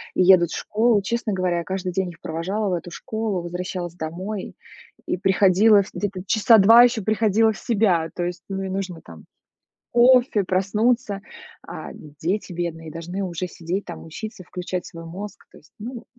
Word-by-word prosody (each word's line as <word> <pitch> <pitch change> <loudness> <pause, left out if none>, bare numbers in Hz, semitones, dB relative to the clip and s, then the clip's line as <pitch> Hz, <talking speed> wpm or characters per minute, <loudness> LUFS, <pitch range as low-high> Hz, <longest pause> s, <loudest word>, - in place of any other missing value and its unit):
и - - +2
едут 180 -2 +6
в - - -3
школу. 220 0 +2
Честно 235 +1 -2
говоря, 180 -2 0
я 170 - -2
каждый 185 0 -3
день 190 0 -1
их 165 - -18
провожала 190 +6 -2
в - - 0
эту 175 0 -4
школу, 215 0 -3
возвращалась 175 0 -5
домой 185 +5 -5 0.5
и - - -1
приходила 195 +2 +5
в - - -14
где-то 200 -3 -3
часа 220 +3 +5
2 225 +4 +8
ещё 235 -3 +2
приходила 220 +1 +3
в 215 - -8
себя. 190 -8 +1
То 175 - -2
есть, 175 0 -4
ну, 195 0 -3
и 190 - -4
нужно 185 -3 -4
там 80 -2 -13 0.7
кофе, 245 -3 +5
проснуться, 205 +3 0 0.5
а - - -7
дети 160 +7 -4
бедные 165 -2 -4
должны 175 +4 -5
уже 180 -1 -3
сидеть 175 +3 -4
там, 170 - -9
учиться, 190 +4 -8
включать 180 0 -5
свой 165 0 -10
мозг. 195 +5 -8
То - - -15
есть, 150 - -23
ну. 235 +2 -7
190 Hz, 180 wpm, -23 LUFS, 175-215 Hz, 0.7 s, 2